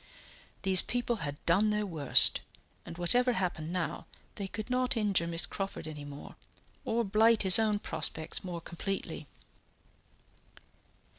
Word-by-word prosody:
These 190 Hz, -2 st, +6 dB
people 240 Hz, -1 st, -2 dB
had 145 Hz, -6 st, -5 dB
done 200 Hz, +6 st, +3 dB
their 210 Hz, 0 st, -1 dB
worst, 155 Hz, -8 st, +4 dB, 0.5 s
and 170 Hz, -, -8 dB
whatever 245 Hz, +8 st, +2 dB
happened 175 Hz, -5 st, -3 dB
now, 175 Hz, -2 st, -4 dB, 0.3 s
they 200 Hz, -, -5 dB
could 210 Hz, +3 st, -6 dB
not 255 Hz, 0 st, +1 dB
injure 200 Hz, -6 st, +1 dB
Miss 165 Hz, 0 st, 0 dB
Crawford 195 Hz, -5 st, -6 dB
any 150 Hz, -2 st, -8 dB
more, 145 Hz, 0 st, -10 dB, 0.5 s
or 235 Hz, +1 st, 0 dB
blight 220 Hz, +2 st, +3 dB
his 190 Hz, +1 st, +7 dB
own 215 Hz, -2 st, +1 dB
prospects 160 Hz, -5 st, -3 dB
more 175 Hz, -2 st, -6 dB
completely. 170 Hz, -3 st, -5 dB
190 Hz, 135 wpm, -30 LUFS, 170-215 Hz, 0.5 s, his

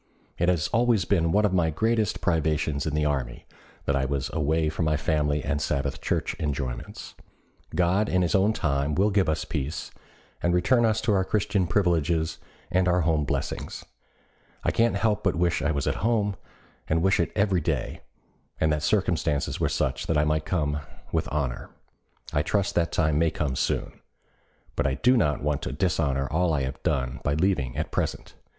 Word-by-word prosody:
It 85 Hz, -, +3 dB
has 85 Hz, -4 st, +1 dB
always 115 Hz, -4 st, +2 dB
been 85 Hz, -5 st, +2 dB
one 105 Hz, +3 st, +3 dB
of 100 Hz, -, +1 dB
my 85 Hz, -3 st, +3 dB
greatest 110 Hz, +5 st, 0 dB
privations 80 Hz, -3 st, 0 dB
in 75 Hz, -, -1 dB
the 75 Hz, 0 st, +1 dB
army 65 Hz, -5 st, -2 dB, 0.4 s
that 70 Hz, -, +1 dB
I 70 Hz, -, +1 dB
was 70 Hz, 0 st, -2 dB
away 80 Hz, +1 st, +1 dB
from 80 Hz, +2 st, -1 dB
my 75 Hz, -1 st, +2 dB
family 75 Hz, -1 st, 0 dB
and 70 Hz, +1 st, -1 dB
Sabbath 70 Hz, -3 st, -2 dB
Church -, -, -1 dB
enjoyments. 70 Hz, -5 st, -4 dB, 0.6 s
God 90 Hz, +4 st, +2 dB
in 90 Hz, 0 st, +2 dB
his 85 Hz, -, 0 dB
own 100 Hz, +1 st, +4 dB
good -, -, -5 dB
time 70 Hz, 0 st, 0 dB
will 100 Hz, +3 st, +3 dB
give 95 Hz, -5 st, +2 dB
us 80 Hz, 0 st, -1 dB
peace, 75 Hz, -1 st, -4 dB, 0.5 s
and 85 Hz, 0 st, +2 dB
return 110 Hz, +7 st, +3 dB
us 110 Hz, 0 st, +1 dB
to 110 Hz, -2 st, +1 dB
our 95 Hz, -1 st, +3 dB
Christian 100 Hz, -2 st, 0 dB
privileges 85 Hz, -4 st, +1 dB, 0.3 s
and 90 Hz, 0 st, +2 dB
our 90 Hz, 0 st, +3 dB
home 80 Hz, -2 st, +1 dB
blessings. -, -, -4 dB, 0.8 s
I -, -, +2 dB
can't 115 Hz, -2 st, +2 dB
help 105 Hz, +1 st, +1 dB
but 95 Hz, -, +1 dB
wish 85 Hz, -1 st, +1 dB
I 75 Hz, -, +1 dB
was 70 Hz, -4 st, -1 dB
at -, -, 0 dB
home, 105 Hz, -2 st, +1 dB, 0.5 s
and 80 Hz, +1 st, +1 dB
wish 95 Hz, 0 st, +3 dB
it 85 Hz, -3 st, +1 dB
every 100 Hz, -4 st, +2 dB
day, -, -, -2 dB, 0.6 s
and 80 Hz, 0 st, +2 dB
that 75 Hz, -, -1 dB
circumstances 80 Hz, -5 st, 0 dB
were -, -, +1 dB
such 65 Hz, 0 st, -1 dB
that 80 Hz, -, +1 dB
I 75 Hz, -, +4 dB
might 75 Hz, 0 st, 0 dB
come 75 Hz, -5 st, 0 dB, 0.3 s
with -, -, -1 dB
honor. 70 Hz, -5 st, -2 dB, 0.6 s
I 75 Hz, -, +2 dB
trust 100 Hz, +6 st, 0 dB
that 85 Hz, -1 st, +1 dB
time 75 Hz, -3 st, +2 dB
may 85 Hz, 0 st, +3 dB
come 75 Hz, -4 st, -2 dB
soon. -, -, -2 dB, 0.8 s
But -, -, +1 dB
I 65 Hz, -, 0 dB
do 125 Hz, -, +3 dB
not 75 Hz, -, +1 dB
want 75 Hz, -1 st, 0 dB
to -, -, -4 dB
dishonor 70 Hz, -4 st, 0 dB
all 80 Hz, 0 st, +2 dB
I 70 Hz, -, 0 dB
have 65 Hz, +1 st, -5 dB
done 65 Hz, -1 st, -1 dB
by 75 Hz, -, +1 dB
leaving 75 Hz, -8 st, 0 dB
at -, -, -2 dB
present. -, -, -3 dB
80 Hz, 190 wpm, -26 LUFS, 75-95 Hz, 0.8 s, own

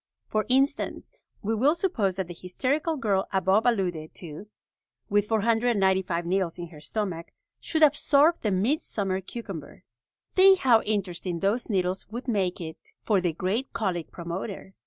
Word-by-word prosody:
For 215 Hz, 0 st, -1 dB
instance, 275 Hz, +3 st, +1 dB, 0.3 s
we 220 Hz, +2 st, 0 dB
will 270 Hz, +8 st, +3 dB
suppose 265 Hz, -, 0 dB
that 190 Hz, -2 st, -3 dB
the 175 Hz, -, -7 dB
hysterical 275 Hz, -, -1 dB
girl 200 Hz, -6 st, 0 dB
above 195 Hz, +3 st, +2 dB
alluded 180 Hz, -9 st, -1 dB
to, 170 Hz, +3 st, -8 dB, 0.6 s
with 205 Hz, 0 st, +3 dB
495 200 Hz, -6 st, +2 dB
needles 180 Hz, -1 st, 0 dB
in 175 Hz, -1 st, -6 dB
her 155 Hz, -3 st, -13 dB
stomach, 175 Hz, -1 st, -4 dB, 0.3 s
should 315 Hz, -1 st, 0 dB
absorb 300 Hz, +2 st, +4 dB
the 215 Hz, -, 0 dB
midsummer 195 Hz, -2 st, 0 dB
cucumber. 190 Hz, -8 st, -8 dB, 0.5 s
Think 380 Hz, 0 st, +7 dB
how 245 Hz, -9 st, +4 dB
interesting 180 Hz, -4 st, -2 dB
those 215 Hz, +6 st, 0 dB
needles 185 Hz, -2 st, -1 dB
would 240 Hz, +4 st, -6 dB
make 195 Hz, -6 st, 0 dB
it 160 Hz, -2 st, -9 dB
for 205 Hz, -4 st, +2 dB
the 175 Hz, -2 st, +1 dB
great 195 Hz, -, -2 dB
colic 180 Hz, -6 st, -2 dB
promoter! 185 Hz, +3 st, -6 dB
200 Hz, 145 wpm, -27 LUFS, 180-235 Hz, 0.6 s, Think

